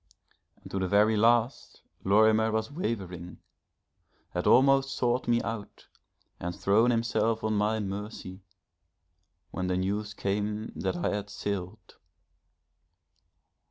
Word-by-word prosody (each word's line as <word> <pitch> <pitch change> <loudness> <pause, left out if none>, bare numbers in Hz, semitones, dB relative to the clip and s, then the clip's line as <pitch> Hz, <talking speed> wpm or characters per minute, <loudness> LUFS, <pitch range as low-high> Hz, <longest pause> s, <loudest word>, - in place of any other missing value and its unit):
And - - -13
to 95 - -2
the 95 - 0
very 105 +3 +4
last 115 +3 +1 0.2
Lorimer 110 +2 +4
was 110 +5 -2
wavering 95 - -4 0.9
had 90 - -2
almost 135 +1 +4
sought 125 0 0
me 120 0 +2
out, 115 -3 -6 0.5
and 90 0 -4
thrown 110 +5 +3
himself 115 -1 0
on 110 0 0
my 105 +1 +1
mercy, 100 -1 -6 1.1
when 90 0 -3
the 90 0 0
news 105 +3 -2
came 105 +2 -2
that - - -2
I 175 - 0
had 100 0 -5
sailed. 100 -1 -5
105 Hz, 120 wpm, -28 LUFS, 100-115 Hz, 1.1 s, very